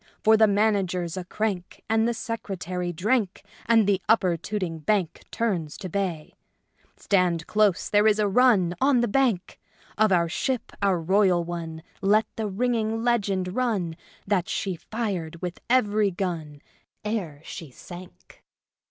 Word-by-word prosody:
For 220 +1 +6
the 220 0 +5
Manager's 195 -4 +1
a 185 -2 -5
crank 195 -3 -3
and 225 +1 +2
the 235 - +1
Secretary 185 -6 -4
drank, 200 +3 0 0.2
and 225 -2 +5
the 195 -1 +1
Upper 190 -6 +4
Tooting 175 -1 -4
Bank 185 +1 -1
Turns 185 -10 -2
to 185 - -6
bay! 175 -5 -3 0.6
Stand 180 -4 +1
close: 210 -4 +2
there 210 +1 +4
is 215 -1 +4
a 210 -1 +2
run 200 -5 +4
On 265 -2 +4
the 240 - +1
Bank. 225 -6 0 0.4
Of 215 -1 +4
our 170 -2 +3
ship, 250 +9 -2
our 195 -3 +2
royal 185 0 +3
one, 165 -2 -6 0.2
let 210 +3 +4
the 220 -1 -2
ringing 225 +1 -1
legend 195 -6 0
run, 210 -10 0 0.3
that 195 -1 0
she 195 -4 -2
fired 175 -4 -4
with 180 -1 -5
every 215 -4 +3
gun 165 -6 -4 0.4
Ere 190 -10 -3
she 160 -2 -8
sank." 175 +8 -13
195 Hz, 145 wpm, -25 LUFS, 175-220 Hz, 0.6 s, For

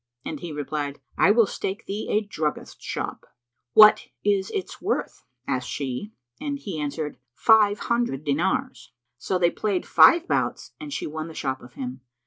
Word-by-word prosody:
and - - -4
he 175 -2 -6
replied, 145 -1 -4 0.2
"I - - +4
will 225 +2 +6
stake 195 +1 -4
thee 205 +2 -4
a 210 - +2
druggist's 155 -6 -4
shop." - - -4 0.5
"What 215 0 +8 0.2
is 200 -2 +1
its 400 - -5
worth?" - - -2 0.2
asked 125 -1 -2
she; 135 - -4 0.3
and 285 -1 -3
he 195 - -6
answered, 150 +1 -3 0.2
"Five 215 -2 +5
hundred 235 - -1
dinars." 180 - -1 0.3
So 185 - -1
they 175 -1 +3
played 200 -4 -1
five 340 +1 +6
bouts - - -1
and 300 -1 -7
she - - -3
won 155 +1 -5
the 160 - -10
shop 130 -1 -3
of 120 0 -14
him. 130 0 -6
185 Hz, 165 wpm, -25 LUFS, 145-215 Hz, 0.5 s, What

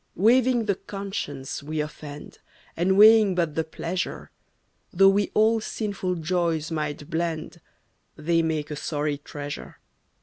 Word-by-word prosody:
Waiving 240 +3 +3
the 205 - +2
conscience 190 -10 -5
we 155 +2 -4
offend, 150 -1 -7 0.4
And 190 +3 +2
weighing 215 -2 +7
but 170 -4 0
the 160 - 0
pleasure, 170 +3 -4 0.6
Though 195 +2 +6
we 200 +1 +2
all 220 +1 +4
sinful 200 -4 -3
joys 165 -1 -1
might 150 -2 -3
blend, 165 0 -3 0.5
They 165 +2 +1
make 155 -2 -2
a - - -3
sorry 145 -1 -2
treasure. 145 0 -7
170 Hz, 130 wpm, -25 LUFS, 150-195 Hz, 0.6 s, weighing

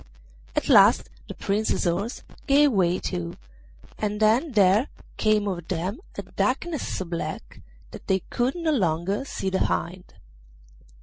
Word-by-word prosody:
At - - 0
last - - +5 0.2
the - - -7
Prince's 210 +2 0
horse 195 +7 -2 0.2
gave 285 0 +5
way 180 -4 +2
too, 85 - -4 0.6
and 210 -1 -2
then 230 +7 +3
there 205 +5 +4 0.3
came 215 -1 +2
over 185 -3 -2
them 180 - -3 0.2
a - - -4
darkness 340 -4 -2
so 190 - -3
black 170 -1 -6 0.3
that - - -11
they 190 -1 +2
could 245 +2 0
no 335 -2 0
longer 190 - 0
see 190 -7 -3
the 190 - 0
hind. 180 +1 -4
200 Hz, 140 wpm, -25 LUFS, 180-240 Hz, 0.6 s, last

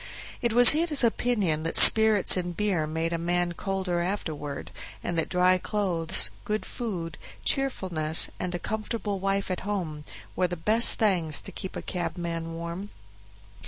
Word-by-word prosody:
It 235 - -1
was 245 +2 +8
his 310 -3 +1
opinion 215 -9 0
that 165 +1 +1
spirits 220 -3 +7
and 175 -2 -5
beer 190 -7 -1
made 160 +2 -3
a 165 - -3
man 175 +1 -1
colder 185 0 -3
afterward, 160 -6 -5 0.3
and 175 - -4
that 165 - -2
dry 180 0 +2
clothes, 185 -4 -1
good 215 0 -4
food, 175 -10 -6 0.3
cheerfulness, 175 - +2
and 180 -1 -4
a - - -1
comfortable 215 +1 -5
wife 195 0 -2
at 185 - -3
home, 175 -7 -5 0.3
were 180 - 0
the 175 0 -6
best 215 +8 +4
things 175 -9 +1
to - - -11
keep 190 - -8
a - - -7
cabman 170 -2 -5
warm. 170 +4 -7
180 Hz, 155 wpm, -25 LUFS, 165-210 Hz, 0.3 s, was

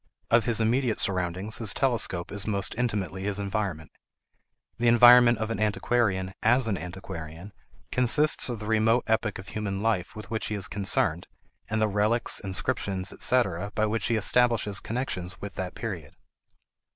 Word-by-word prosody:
Of 115 0 +4
his 115 -2 +1
immediate 115 +1 +1
surroundings, 95 +2 -1
his 110 -4 +4
telescope 115 -9 -1
is 100 0 -4
most 100 -2 -1
intimately 100 -6 -2
his 100 0 -2
environment. 100 -5 -3 0.9
The 120 - +1
environment 120 0 +7
of 110 +1 -3
an 115 - -3
antiquarian, 105 -3 0
as 120 +2 +3
an 105 - 0
antiquarian, 90 0 -8 0.4
consists 125 +4 +3
of 120 - -3
the 105 - -8
remote 110 +2 +2
epoch 110 -2 0
of 95 +1 -10
human 100 -2 -4
life 110 -4 -1
with 105 -1 -10
which 110 - -2
he 105 - -3
is 100 - -1
concerned, 95 -4 +1 0.4
and 110 +1 -1
the 110 - +2
relics, 105 +3 0
inscriptions, 95 -1 -2
etc., 100 -6 0
by 110 - +1
which 110 +1 -1
he 115 - +1
establishes 110 -2 +2
connections 105 -7 -4
with 100 -1 -7
that 90 -1 -6
period. 90 -10 -6
105 Hz, 160 wpm, -26 LUFS, 95-115 Hz, 0.9 s, environment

